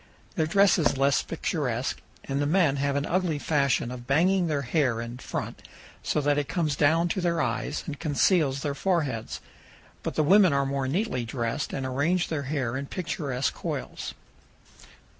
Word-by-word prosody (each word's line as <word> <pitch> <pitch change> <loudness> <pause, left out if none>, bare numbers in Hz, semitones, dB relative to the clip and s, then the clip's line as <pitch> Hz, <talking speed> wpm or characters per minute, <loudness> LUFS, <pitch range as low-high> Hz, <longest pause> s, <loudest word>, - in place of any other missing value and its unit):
Their 160 - 0
dress 200 +3 +4
is 150 - +2
less 135 +1 +3
picturesque, 135 -7 -2 0.2
and 140 +1 -2
the 145 - +1
men 155 -4 +3
have 140 0 0
an 140 0 0
ugly 180 -3 0
fashion 140 -5 +1
of 120 -1 -8
banging 175 +6 +3
their 145 -3 -1
hair 125 -3 +1
in 120 +1 -6
front - - -5 0.4
so - - 0
that 145 0 +2
it 145 -1 -3
comes 155 -2 0
down 160 +4 +3
to 185 - -1
their 170 -1 +1
eyes 125 +4 -2
and 145 -2 -6
conceals 150 -2 +2
their 145 - -1
foreheads. 145 - -1 0.6
But - - -4
the 155 - +2
women 190 +1 +6
are 140 0 +2
more 135 -1 -1
neatly 170 - -1
dressed 120 +3 -3
and 135 - -3
arrange 160 +8 0
their 155 -3 -1
hair 130 -5 -1
in 140 +1 -5
picturesque 140 -7 -2
coils. - - -5
145 Hz, 175 wpm, -27 LUFS, 135-165 Hz, 0.6 s, women